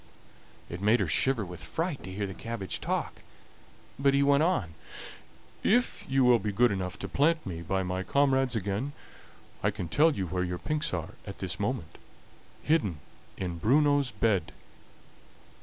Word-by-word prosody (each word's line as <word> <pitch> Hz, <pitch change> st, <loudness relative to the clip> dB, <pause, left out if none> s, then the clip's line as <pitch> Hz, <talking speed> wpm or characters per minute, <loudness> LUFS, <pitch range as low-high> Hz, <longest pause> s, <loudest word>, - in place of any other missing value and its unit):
It 85 Hz, +2 st, -7 dB
made 110 Hz, +4 st, +4 dB
her 95 Hz, -, +1 dB
shiver 115 Hz, -, +2 dB
with 90 Hz, -2 st, -8 dB
fright 160 Hz, -, -3 dB
to 95 Hz, -, -8 dB
hear 100 Hz, +2 st, -2 dB
the 95 Hz, -, -5 dB
cabbage 110 Hz, -2 st, -5 dB
talk, -, -, -2 dB, 0.8 s
but 140 Hz, 0 st, +3 dB
he 140 Hz, -, +4 dB
went 140 Hz, +1 st, +4 dB
on: 135 Hz, -, +1 dB, 0.9 s
"If 245 Hz, +4 st, +2 dB
you 135 Hz, 0 st, +3 dB
will 125 Hz, -1 st, +6 dB
be 105 Hz, 0 st, -2 dB
good 120 Hz, +4 st, +3 dB
enough 90 Hz, -2 st, -3 dB
to -, -, -5 dB
plant 160 Hz, +3 st, +2 dB
me 85 Hz, -3 st, -5 dB
by 95 Hz, +3 st, -1 dB
my 90 Hz, 0 st, -2 dB
comrades 135 Hz, +2 st, +2 dB
again, 105 Hz, +7 st, -2 dB, 0.7 s
I -, -, +2 dB
can 90 Hz, -, -4 dB
tell 160 Hz, -, +4 dB
you 95 Hz, -, -2 dB
where 90 Hz, +1 st, -1 dB
your 90 Hz, 0 st, -3 dB
pinks 155 Hz, +9 st, -2 dB
are 85 Hz, -3 st, -4 dB
at 100 Hz, -, -7 dB
this 95 Hz, 0 st, -3 dB
moment 105 Hz, -6 st, -3 dB, 0.6 s
hidden 105 Hz, -, +1 dB, 0.4 s
in 90 Hz, -3 st, -4 dB
Bruno's 145 Hz, -, +3 dB
bed!" 100 Hz, -6 st, 0 dB
105 Hz, 165 wpm, -29 LUFS, 90-140 Hz, 0.9 s, will